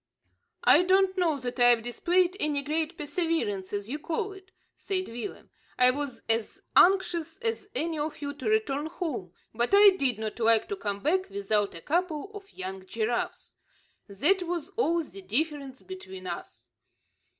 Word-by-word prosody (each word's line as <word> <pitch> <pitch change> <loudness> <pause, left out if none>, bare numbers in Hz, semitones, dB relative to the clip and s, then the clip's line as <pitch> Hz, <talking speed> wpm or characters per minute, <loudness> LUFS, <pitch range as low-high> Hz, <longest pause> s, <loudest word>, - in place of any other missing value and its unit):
"I - - +7
don't 380 +1 +3
know 340 -5 +2
that 250 -1 -5
I've 240 -2 +5
displayed 350 +9 +1
any 295 -2 0
great 310 +3 -1
perseverance 295 - -1
as 205 0 -3
you 290 +6 -4
call 395 +7 -2
it," 385 -1 -15 0.3
said 375 -1 -3
Willem. 240 - -7 0.3
"I 250 0 +6
was 280 -1 -5
as 225 - -1
anxious 355 -4 +4
as 455 -3 -2
any 320 -1 -1
of 300 +1 -3
you 285 0 -4
to 300 +9 -3
return 315 -10 +1
home, 310 - -4 0.2
but 240 - +2
I 405 0 +9
did 270 - +1
not 220 +1 -5
like 225 -1 +3
to 410 - -1
come 200 - -4
back 370 +5 +1
without 200 0 0
a 165 - -9
couple 340 - -1
of 405 -1 -10
young 190 0 -7
giraffes. 230 +3 -2 0.5
That 300 - +2
was 345 -3 -3
all 340 -7 +1
the 195 -9 -11
difference 275 - -2
between 190 - -9
us." 120 -9 -8
295 Hz, 160 wpm, -28 LUFS, 225-365 Hz, 0.5 s, I